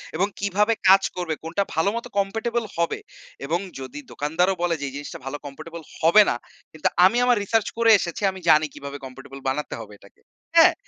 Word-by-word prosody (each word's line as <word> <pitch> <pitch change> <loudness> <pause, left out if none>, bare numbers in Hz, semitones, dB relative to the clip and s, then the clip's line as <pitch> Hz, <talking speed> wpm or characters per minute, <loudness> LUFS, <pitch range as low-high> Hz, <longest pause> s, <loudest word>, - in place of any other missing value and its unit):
এবং 185 +5 +2
কিভাবে 205 +3 +2 0.2
কাজ 195 0 +7
করবে 175 -3 -2
কোনটা 165 +5 -1
ভাল 160 - +1
মত 235 - -4
কম্প্যাটেবল 225 +4 0
হবে 170 0 0 0.5
এবং 165 +5 0 0.2
যদি 130 +2 -7
দোকানদারও 165 +6 0
বলে 175 -1 +1
যে - - -2
এই - - -13
জিনিসটা 145 0 -7
ভালো 135 +2 -4
কম্প্যাটবল 165 +4 -8 0.2
হবে 170 +6 +7
না। - - +1 0.4
কিন্তু 155 - -1 0.2
আমি 225 +6 +4
আমার 245 -1 +4
রিসার্চ 220 +1 +1
করে 230 -1 +5
এসেছি, 170 +1 -4
আমি 190 - -10
জানি 155 0 +6
কিভাবে 140 0 -7
কম্প্যাটেবল 135 +1 -10
বানাতে 150 +3 -3
হবে - - -10
এটাকে, - - -21 0.3
হ্যাঁ? - - +8
170 Hz, 190 wpm, -24 LUFS, 145-200 Hz, 0.5 s, হ্যাঁ